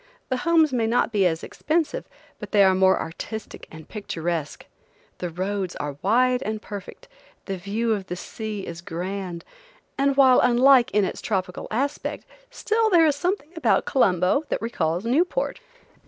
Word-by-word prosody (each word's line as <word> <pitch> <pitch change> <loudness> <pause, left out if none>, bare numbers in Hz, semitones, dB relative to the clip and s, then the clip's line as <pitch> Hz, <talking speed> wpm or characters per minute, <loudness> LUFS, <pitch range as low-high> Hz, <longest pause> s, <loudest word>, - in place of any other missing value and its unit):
The 255 - 0
homes 320 0 +3
may 230 -3 +1
not 235 0 +1
be 200 -4 +3
as 160 -1 -2
expensive, 315 0 -2 0.3
but - - -8
they 205 -1 +6
are 190 -1 +5
more 190 0 +4
artistic 215 +6 -7
and 160 -1 -12
picturesque. 170 -7 -4 0.5
The 180 - -3
roads 185 +2 -3
are 145 -1 -5
wide 250 +4 +3
and 215 -2 -3
perfect; 205 -3 -9 0.4
the 195 - -3
view 210 +5 -2
of 195 -3 -4
the 180 - -4
sea 210 +2 -6
is 170 0 -7
grand, 180 0 -5 0.5
and 275 0 +2
while 260 -2 +7
unlike 250 +1 +5
in 205 -1 +2
its - - -5
tropical 185 -3 -3
aspect, 275 +6 -2 0.2
still 445 +1 0
there 340 -4 +5
is 300 -3 +3
something 350 -1 -2
about 330 - +2
Colombo 185 - +2
that - - -1
recalls 175 -4 -1
Newport. 345 - 0
215 Hz, 160 wpm, -24 LUFS, 185-265 Hz, 0.5 s, while